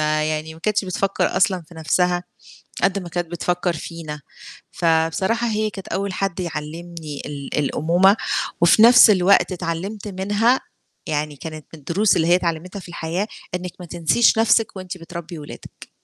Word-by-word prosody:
ما 155 Hz, 0 st, +1 dB
يعني 155 Hz, +1 st, -3 dB
ما 160 Hz, -, -15 dB
كانتش 210 Hz, +2 st, 0 dB
بتفكّر 190 Hz, +1 st, -1 dB
أصلًا 185 Hz, -1 st, +2 dB
في 165 Hz, +2 st, -17 dB
نفْسها 175 Hz, +2 st, +1 dB, 0.6 s
قد 195 Hz, +1 st, +2 dB
ما 180 Hz, -2 st, -8 dB
كانت 175 Hz, +1 st, -3 dB
بتفكّر 175 Hz, +1 st, -1 dB
فينا. 155 Hz, -2 st, -7 dB, 0.5 s
فبصراحة 170 Hz, +8 st, +1 dB
هي 215 Hz, -1 st, 0 dB
كانت 195 Hz, -2 st, -9 dB
أول 195 Hz, 0 st, -2 dB
حد 195 Hz, -1 st, -2 dB
يعلمني 160 Hz, -2 st, -6 dB
ال 140 Hz, -1 st, -5 dB
الأمومة، 170 Hz, +7 st, +3 dB, 0.5 s
وفي 170 Hz, +5 st, +6 dB
نفْس 240 Hz, +1 st, +9 dB
الوقت 185 Hz, -2 st, +4 dB
اتعلمت 185 Hz, +4 st, -4 dB
منها 205 Hz, +6 st, +1 dB, 0.5 s
يعني 150 Hz, 0 st, -2 dB
كانت 155 Hz, +1 st, -8 dB
من 160 Hz, -, -10 dB
الدروس 180 Hz, +8 st, +2 dB
اللي 160 Hz, -, +2 dB
هي 175 Hz, -, +6 dB
اتعلمتها 180 Hz, +2 st, -2 dB
في 180 Hz, -, -12 dB
الحياة 170 Hz, +4 st, -3 dB, 0.3 s
إنِّك 180 Hz, 0 st, -5 dB
ما 180 Hz, -, -8 dB
تنسيش 175 Hz, +8 st, +2 dB
نفْسِك 225 Hz, -1 st, +3 dB
وأنتِ 185 Hz, -1 st, -7 dB
بتربّي 170 Hz, -1 st, -8 dB
ولادِك. 145 Hz, -, -11 dB
175 Hz, 155 wpm, -21 LUFS, 160-195 Hz, 0.6 s, نفْس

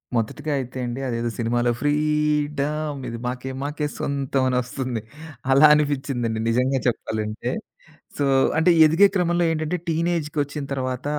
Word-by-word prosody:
మొదటిగా 145 Hz, +7 st, -2 dB
అయితే 130 Hz, 0 st, -6 dB
అండి. 120 Hz, +2 st, -4 dB
అదేదో 120 Hz, -1 st, -1 dB
సినిమాలో 120 Hz, +1 st, +1 dB
ఫ్రీడమ్ 150 Hz, 0 st, 0 dB
ఇది 115 Hz, -, -5 dB
మాకే 130 Hz, +1 st, -4 dB
మాకే 150 Hz, +1 st, -2 dB
సొంతం 135 Hz, -1 st, -1 dB
అనొస్తుంది. 125 Hz, -1 st, -2 dB, 0.5 s
అలా 140 Hz, +3 st, +7 dB
అనిపించిందండి 135 Hz, -6 st, 0 dB
నిజంగా 130 Hz, +3 st, +1 dB
చెప్పాలంటే. 110 Hz, -2 st, -2 dB, 0.7 s
సో, 145 Hz, -, +1 dB, 0.3 s
అంటే 160 Hz, +3 st, +4 dB, 0.2 s
ఎదిగే 165 Hz, +6 st, +6 dB
క్రమంలో 175 Hz, -1 st, +2 dB
ఏంటంటే 155 Hz, +2 st, -1 dB
టీనేజ్‌కి 165 Hz, -2 st, -1 dB
వచ్చిన 145 Hz, +1 st, -6 dB
తర్వాత 130 Hz, -1 st, -3 dB
140 Hz, 125 wpm, -23 LUFS, 125-150 Hz, 0.7 s, అలా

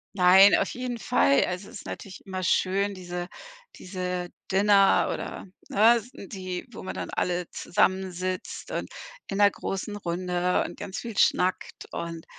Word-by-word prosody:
Nein, 190 Hz, +2 st, +7 dB
auf -, -, +1 dB
jeden 250 Hz, -1 st, -4 dB
Fall. 140 Hz, -, +3 dB
Also, 185 Hz, +2 st, -5 dB
es 235 Hz, -, -9 dB
ist -, -, -12 dB
natürlich 190 Hz, -2 st, -8 dB
immer 185 Hz, -1 st, -4 dB
schön, 195 Hz, +3 st, +1 dB
diese 175 Hz, -1 st, -5 dB, 0.5 s
diese 180 Hz, -1 st, -4 dB, 0.2 s
Dinner 195 Hz, 0 st, +4 dB
oder, -, -, -6 dB, 0.2 s
ne? 225 Hz, +4 st, +6 dB
S 235 Hz, +2 st, -8 dB
die, 185 Hz, +1 st, -6 dB
wo -, -, -9 dB
man 185 Hz, -, -5 dB
dann -, -, -5 dB
alle 180 Hz, -1 st, -1 dB
zusammensitzt 185 Hz, 0 st, -1 dB
und -, -, -4 dB, 0.4 s
in 195 Hz, -, -4 dB
'ner 205 Hz, 0 st, +6 dB
großen 200 Hz, +1 st, -4 dB
Runde 180 Hz, -1 st, 0 dB
und -, -, -8 dB
ganz 200 Hz, -2 st, -6 dB
viel 230 Hz, -4 st, -7 dB
schnackt 185 Hz, +1 st, +1 dB
und 165 Hz, -1 st, -5 dB
185 Hz, 155 wpm, -26 LUFS, 180-200 Hz, 0.5 s, Nein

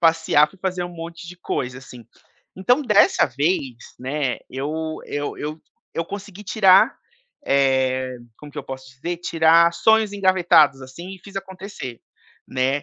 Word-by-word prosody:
passear, 165 Hz, -2 st, +4 dB
fui 190 Hz, -, -20 dB
fazer 185 Hz, -1 st, -2 dB
um -, -, -5 dB
monte 165 Hz, +1 st, -8 dB
de 180 Hz, -, -10 dB
coisa, 125 Hz, -7 st, -4 dB
assim. 125 Hz, -3 st, -13 dB, 0.5 s
Então 245 Hz, +9 st, +2 dB
dessa 210 Hz, -6 st, +4 dB
vez, 135 Hz, -1 st, -1 dB, 0.2 s
né, 135 Hz, 0 st, -2 dB
eu 155 Hz, +4 st, -4 dB
eu 145 Hz, 0 st, -4 dB
eu 155 Hz, +2 st, -6 dB, 0.3 s
eu 165 Hz, -, -1 dB
consegui 200 Hz, +2 st, -8 dB
tirar, 195 Hz, -2 st, +5 dB, 0.5 s
eh, 130 Hz, -2 st, +1 dB, 0.2 s
como 150 Hz, -, -11 dB
que -, -, -7 dB
eu -, -, -6 dB
posso 130 Hz, 0 st, -8 dB
dizer, 140 Hz, +7 st, -5 dB
tirar 165 Hz, 0 st, +4 dB
sonhos 220 Hz, +2 st, +3 dB
engavetados 175 Hz, -8 st, +4 dB
assim 170 Hz, +8 st, -9 dB
e -, -, -14 dB
fiz 195 Hz, 0 st, -12 dB
acontecer, 190 Hz, -, -7 dB, 0.5 s
né. 130 Hz, +2 st, 0 dB
160 Hz, 150 wpm, -22 LUFS, 135-185 Hz, 0.5 s, tirar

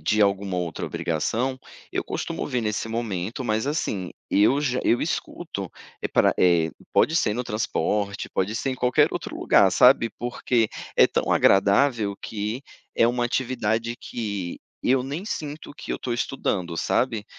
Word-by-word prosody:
de 105 Hz, +8 st, +1 dB
alguma 100 Hz, -2 st, +1 dB
outra 85 Hz, -3 st, -3 dB
obrigação, 115 Hz, +11 st, -1 dB, 0.3 s
eu -, -, -2 dB
costumo -, -, -3 dB
ver 125 Hz, -, -1 dB
nesse 110 Hz, 0 st, -2 dB
momento, 115 Hz, 0 st, -3 dB
mas 110 Hz, +2 st, 0 dB
assim, 105 Hz, -, -2 dB, 0.2 s
eu 110 Hz, +8 st, +4 dB
já 130 Hz, -4 st, 0 dB
eu 120 Hz, -, +3 dB
escuto 155 Hz, -, -4 dB, 0.3 s
e -, -, -1 dB
pra, -, -, +3 dB
eh, 85 Hz, -3 st, +4 dB, 0.2 s
pode 160 Hz, -, +3 dB
ser 105 Hz, -10 st, +2 dB
no 125 Hz, -, -1 dB
transporte, 105 Hz, -2 st, -1 dB
pode 95 Hz, +3 st, -1 dB
ser 125 Hz, +4 st, -1 dB
em -, -, -2 dB
qualquer 125 Hz, -1 st, +3 dB
outro -, -, -5 dB
lugar, 95 Hz, -, +4 dB
sabe. 125 Hz, 0 st, +5 dB
Porque 120 Hz, -1 st, 0 dB, 0.3 s
é -, -, +7 dB
tão -, -, 0 dB
agradável, 100 Hz, +2 st, +4 dB
que 110 Hz, +4 st, -4 dB, 0.3 s
é 115 Hz, -, +4 dB
uma 120 Hz, +1 st, +1 dB
atividade 120 Hz, -2 st, -1 dB
que 100 Hz, -8 st, -5 dB, 0.2 s
eu 130 Hz, 0 st, +3 dB
nem 145 Hz, +8 st, -5 dB
sinto 150 Hz, -8 st, -5 dB
que -, -, -8 dB
eu -, -, -1 dB
estou 125 Hz, -, -4 dB
estudando, 95 Hz, -8 st, -2 dB
sabe. 115 Hz, +3 st, 0 dB
115 Hz, 160 wpm, -24 LUFS, 100-125 Hz, 0.3 s, é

